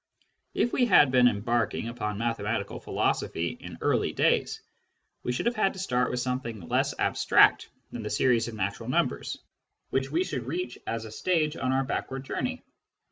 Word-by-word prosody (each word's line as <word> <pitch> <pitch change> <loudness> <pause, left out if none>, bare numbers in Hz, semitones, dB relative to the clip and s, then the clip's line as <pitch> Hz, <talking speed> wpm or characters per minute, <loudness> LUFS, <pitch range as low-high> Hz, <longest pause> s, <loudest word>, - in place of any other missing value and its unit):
If 240 - +1
we 245 - +3
had 145 - +6
been 125 -1 +6
embarking 115 +1 0
upon 105 -3 -3
mathematical 115 +1 -2
philosophy 85 +1 -1
in - - -9
earlier - - +1
days, - - +2 0.6
we - - -2
should 125 - -2
have 235 - +2
had 195 -3 +2
to 190 - -9
start 125 -9 +1
with 125 - -2
something 125 -4 -3
less - - 0
abstract - - +4 0.2
than 120 - -5
the 105 - -4
series 120 -2 +2
of 115 - -6
natural 100 -1 -3
numbers, - - 0 0.5
which 135 0 0
we 165 +5 +1
should 130 -10 -4
reach 120 -2 -3
as 115 -1 -3
a 110 - -9
stage 155 +4 0
on 130 - -1
our 135 +1 +2
backward 135 0 -3
journey. - - -3
125 Hz, 175 wpm, -28 LUFS, 115-135 Hz, 0.6 s, had